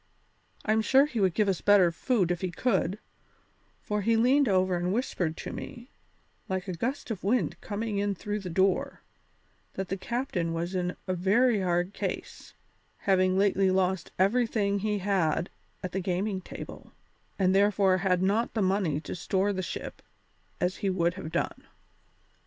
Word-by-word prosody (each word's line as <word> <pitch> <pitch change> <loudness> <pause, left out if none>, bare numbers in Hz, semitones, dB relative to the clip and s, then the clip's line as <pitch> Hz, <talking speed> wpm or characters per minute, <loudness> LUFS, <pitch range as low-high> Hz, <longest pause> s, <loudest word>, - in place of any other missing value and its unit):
I'm 220 +1 +3
sure 270 +5 +5
he 260 -6 -4
would 190 -4 +2
give 210 -2 +2
us 190 -2 0
better 200 -4 +5
food 185 +1 +1
if 175 - -2
he 185 - -1
could, 195 0 0 0.9
for 210 0 -1
he 230 +3 +2
leaned 260 +3 +4
over 185 -1 +2
and 175 +1 -1
whispered 185 -8 -1
to - - -6
me, 245 -1 -8 0.6
like 190 0 -2
a 185 - -3
gust 245 - -3
of 205 - -5
wind 190 -6 0
coming 210 -1 -3
in 200 0 0
through 210 +3 -3
the 190 -3 -6
door, 190 +2 +1 0.7
that 190 -1 -4
the 195 - -2
captain 190 -7 -2
was 170 +2 -3
in 180 -1 -1
a 185 - 0
very 205 +6 +3
hard 175 +1 0
case, - - -5 0.5
having 185 -1 +3
lately 195 -1 +3
lost 185 -1 +1
everything 200 0 +2
he 210 +1 0
had 180 -4 0 0.3
at 185 - -3
the 190 - -2
gaming 185 +2 -1
table, - - -10 0.4
and 185 -1 +3
therefore 195 -1 +3
had 180 -1 +1
not 215 +6 +1
the 215 - +2
money 185 -6 +1
to - - -6
store 190 +3 0
the 185 - -2
ship - - -6 0.6
as 180 -1 0
he 200 - -1
would 175 -2 +1
have 175 -4 -7
done." - - -2
190 Hz, 170 wpm, -28 LUFS, 180-210 Hz, 0.9 s, sure